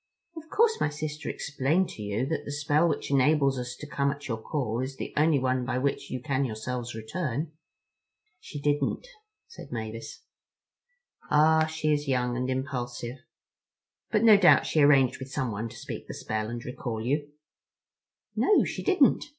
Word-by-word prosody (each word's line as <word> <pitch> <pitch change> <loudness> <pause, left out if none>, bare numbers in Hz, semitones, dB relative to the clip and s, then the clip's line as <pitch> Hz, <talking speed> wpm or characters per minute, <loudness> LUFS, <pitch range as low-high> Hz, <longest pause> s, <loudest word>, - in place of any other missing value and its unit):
"Of 320 0 -10
course 450 +3 +2
my - - +2
sister 150 +1 -5
explained 150 +6 0
to - - -9
you 105 +4 -1
that 160 +3 -2
the - - -6
spell 150 +3 +2
which 145 - -3
enables 140 -1 +3
us 125 0 -5
to 150 - -9
come 140 -1 0
at 140 +1 -5
your 115 -3 -3
call 120 -4 -2
is 130 +1 -3
the - - -6
only 150 0 +4
one 130 -1 0
by 125 0 -1
which 140 +2 -1
you 130 - -3
can 135 +1 -1
yourselves 120 0 -4
return." 145 +5 -3 0.9
"She 145 - -8
didn't," 145 - 0 0.4
said 465 - -12
Mavis. 115 -1 -6 1.1
"Ah, 155 +1 +4
she 155 -1 0
is 145 0 -1
young 125 -2 0
and 125 +1 -2
impulsive. 125 -2 -3 0.9
But 210 - +2
no 220 -3 +8
doubt 185 -3 +6
she 155 - +2
arranged 140 -3 +5
with 130 0 -7
someone 115 -4 -2
to 120 - -12
speak - - -7
the - - -7
spell 110 0 -3
and 120 0 -6
recall 120 -2 -4
you?" 145 +3 -1 1.0
"No, 420 - +4
she - - -4
didn't. 360 -9 +3
140 Hz, 170 wpm, -28 LUFS, 125-150 Hz, 1.1 s, no